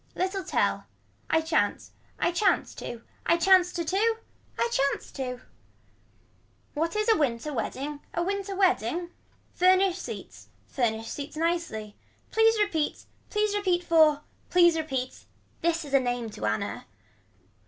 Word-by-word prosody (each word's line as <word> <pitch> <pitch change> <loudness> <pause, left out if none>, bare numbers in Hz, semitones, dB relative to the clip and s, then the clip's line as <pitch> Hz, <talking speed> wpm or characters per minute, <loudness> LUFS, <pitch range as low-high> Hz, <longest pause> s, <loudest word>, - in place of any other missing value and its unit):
Little 380 +1 -1
tell. - - 0 0.4
I 320 - +3
chance. 315 -11 0 0.3
I 345 - +1
chance 375 +2 +1
to. 235 -1 -7 0.2
I 335 - +4
chance 360 +1 +5
to 340 -1 -2
to. 440 +6 +1 0.4
I 470 - +2
chance 280 - 0
to. 255 -2 -5 1.3
What 330 +5 -1
is 425 +1 0
a 450 - +6
winter 290 0 -1
wedding 285 +4 -3
a 340 - -1
winter 395 +1 -2
wedding. 355 - +1 0.4
Furnish 370 0 +4
seats. - - -8 0.2
Furnish 225 -3 -1
seats 285 +4 -6
nicely. 325 -11 -2 0.4
Please 445 0 +4
repeat. 335 -8 0 0.2
Please 420 -1 +1
repeat 365 -4 +1
for. 315 -3 +5 0.3
Please 345 -2 +5
repeat. 270 -5 -3 0.4
This 335 -1 0
is 280 - -9
a 275 - +7
name 245 -3 -2
to 105 - -4
Anna. 105 0 -2
335 Hz, 135 wpm, -27 LUFS, 275-375 Hz, 1.3 s, a